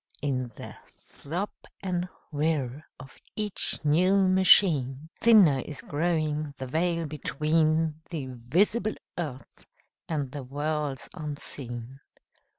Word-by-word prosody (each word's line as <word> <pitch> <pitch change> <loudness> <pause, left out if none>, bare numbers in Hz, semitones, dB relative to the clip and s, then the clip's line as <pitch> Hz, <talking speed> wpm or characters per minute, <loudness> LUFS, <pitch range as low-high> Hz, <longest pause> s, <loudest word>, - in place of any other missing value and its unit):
In 130 -4 -1
the - - -9 0.2
throb 175 +8 -5 0.3
and 180 -1 -1 0.2
whir 150 -2 -1
of 135 +1 -12 0.2
each 210 -2 -2
new 185 +6 +4
machine 160 -7 +4
Thinner 200 -12 +7
is 145 +2 -7
growing 155 -2 -1
the 130 - -5
veil 165 +4 0
between 155 +1 +1
The 155 -6 -4
visible 185 - +1 0.2
earth 145 -7 -7 0.4
and 145 -5 -2
the 145 - -5
worlds 145 +1 -3
unseen. 135 -5 -5
155 Hz, 105 wpm, -28 LUFS, 135-175 Hz, 0.4 s, Thinner